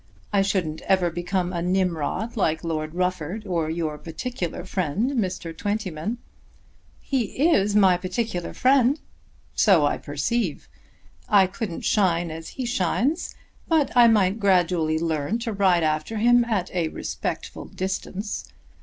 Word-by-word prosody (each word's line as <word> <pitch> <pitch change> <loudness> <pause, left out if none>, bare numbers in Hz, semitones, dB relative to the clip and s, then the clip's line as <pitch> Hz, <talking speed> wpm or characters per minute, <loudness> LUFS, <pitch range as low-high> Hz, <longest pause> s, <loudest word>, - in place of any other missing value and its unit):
I 200 - +4
shouldn't 185 -6 -1
ever 185 -3 +3
become 175 +1 -2
a 170 - -2
Nimrod, 180 +4 -1
like 160 -7 0
Lord 155 -1 -3
Rufford 180 +3 -2
or 170 -5 -1
your 160 -2 -3
particular 175 0 -5
friend 190 - -1
Mr. 185 -9 -2
Twentyman." 205 +1 -3 0.8
"He 265 +3 0
is 205 -7 +2
my 190 -4 +5
particular 180 0 -3
friend." 265 +2 +4 0.5
"So 185 -8 +4
I 145 - 0
perceive. 150 - -2 0.6
I 200 -3 +6
couldn't 185 -1 -5
shine 175 -5 +2
as 160 +1 -7
he 260 - -2
shines, 245 - 0 0.3
but 315 -6 +2
I 240 -1 +8
might 210 -2 +3
gradually 180 -5 +2
learn 160 +4 -1
to 235 -1 -4
ride 190 -4 +3
after 155 +7 -1
him 240 +2 +4
at 210 -6 -1
a 175 -3 0
respectful - - -5
distance. 190 +2 -4
185 Hz, 135 wpm, -24 LUFS, 165-220 Hz, 0.8 s, I